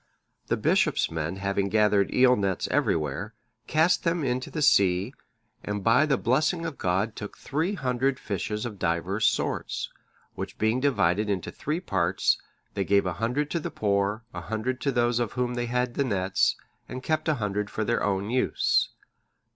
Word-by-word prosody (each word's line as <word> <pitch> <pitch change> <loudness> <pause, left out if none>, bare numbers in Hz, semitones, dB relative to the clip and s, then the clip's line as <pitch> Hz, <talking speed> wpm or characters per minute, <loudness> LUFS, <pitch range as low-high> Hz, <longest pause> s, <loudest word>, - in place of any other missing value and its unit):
The - - +1
bishop's - - +2
men 80 +2 -3
having 100 0 -1
gathered 105 -1 +3
eel 125 0 +5
nets 100 -4 -1
everywhere, 100 - 0 0.3
cast 160 +3 +3
them 170 -1 0
into 130 -1 -1
the 150 - -2
sea, 100 -5 +3 0.5
and 105 -1 -3
by 125 +8 +4
the 135 - +2
blessing 155 +7 +1
of 160 -4 -5
God 95 +5 0
took 105 - -7
three 165 +8 -1
hundred 130 -3 0
fishes 105 -2 -3
of 105 -5 -6
divers 95 +5 +1
sorts, - - -1 0.4
which - - -6
being 110 +3 +1
divided 105 -7 +2
into 95 -3 -2
three 155 +3 -3
parts, 95 - +1 0.3
they 100 - -1
gave 100 0 +3
a 90 - -1
hundred 140 +6 0
to 170 - 0
the - - -4
poor, 100 +1 0
a 90 - -5
hundred 110 +8 -3
to 140 - +1
those 120 -1 +1
of 120 -3 -2
whom 125 -1 -1
they 120 0 -2
had 125 0 0
the 140 - +1
nets, 95 -6 +1 0.3
and 130 +1 -6
kept 155 0 -1
a 155 - +3
hundred 105 -3 -2
for 110 - -2
their 120 +1 0
own 100 +1 -1
use. 130 +1 +2
110 Hz, 175 wpm, -27 LUFS, 100-130 Hz, 0.5 s, eel